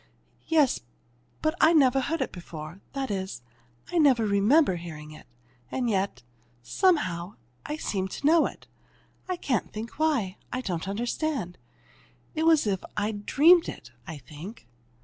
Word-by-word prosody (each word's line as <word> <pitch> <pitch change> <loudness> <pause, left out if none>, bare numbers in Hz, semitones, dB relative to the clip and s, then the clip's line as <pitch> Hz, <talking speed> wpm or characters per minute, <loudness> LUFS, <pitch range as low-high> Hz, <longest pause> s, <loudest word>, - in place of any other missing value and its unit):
"Yes 305 -5 +3 0.6
but 310 0 +2
I 320 - +6
never 270 -4 +5
heard 325 +6 -1
it - - -6
before; 170 0 -9
that 270 -4 -3
is, 190 -11 -4 0.5
I 350 - +2
never 260 -7 +5
remember 205 - +4
hearing 155 -3 -8
it, 155 - -13 0.4
and 250 - -1
yet 195 - -1 0.4
somehow 185 - +1 0.3
I 300 - -2
seemed 190 -10 -2
to - - -6
know 320 +2 +5
it. - - -12 0.6
I 365 - -1
can't 255 -8 -1
think 225 +6 -7
why. 270 -12 +1
I 255 - -2
don't 180 -6 -3
understand. 235 - -2 0.7
It's 320 +1 +3
as 315 -5 +4
if 195 -3 -1
I'd 205 0 -2
dreamed 330 +4 +6
it, 115 - -9 0.2
I 160 - -6
think." 155 - -10
220 Hz, 150 wpm, -27 LUFS, 185-300 Hz, 0.7 s, I